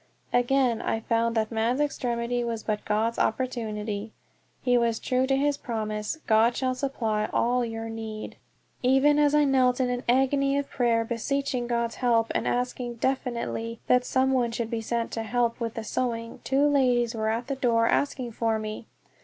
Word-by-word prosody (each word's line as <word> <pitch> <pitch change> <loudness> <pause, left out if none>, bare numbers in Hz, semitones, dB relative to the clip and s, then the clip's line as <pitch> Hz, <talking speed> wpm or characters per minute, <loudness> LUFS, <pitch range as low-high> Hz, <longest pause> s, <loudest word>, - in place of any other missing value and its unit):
Again 245 -1 +2
I 225 - -1
found 230 0 0
that 220 0 0
man's 230 +4 0
extremity 245 -4 -1
was 230 -2 -3
but 210 -1 -2
God's 220 +2 0
opportunity. 220 -3 -2 0.5
He 250 -1 +3
was 235 -2 +2
true 255 +2 0
to 270 - +2
his 285 +1 +1
promise, 215 +1 -3
"God 225 +2 +4
shall 255 -1 0
supply 225 -6 -1
all 245 +1 +2
your 225 -1 -4
need." 220 -1 -6 0.4
Even 270 +3 +4
as 295 0 +4
I 300 - +5
knelt 260 -2 +3
in 250 -1 +1
an 245 0 -2
agony 275 +2 +3
of 280 0 -3
prayer, 230 -2 +1
beseeching 250 +1 -2
God's 235 -1 -1
help, 230 -2 +2
and - - -1
asking 245 -1 -2
definitely 235 -2 -2
that 250 0 +4
some 260 +1 +1
one 250 -3 +2
should 230 0 -3
be 230 -1 -1
sent 230 +1 -2
to - - -3
me - - -2
to - - -9
help 240 0 +1
with 230 -2 -3
the 225 - -4
sewing, 230 0 -3
two 275 +2 +2
ladies 250 -5 +2
were 220 -1 -1
at 230 +2 -1
the 275 - -3
door 230 -3 +2
asking 260 -3 0
for 225 0 0
me! 215 +1 -6
240 Hz, 185 wpm, -26 LUFS, 225-255 Hz, 0.5 s, I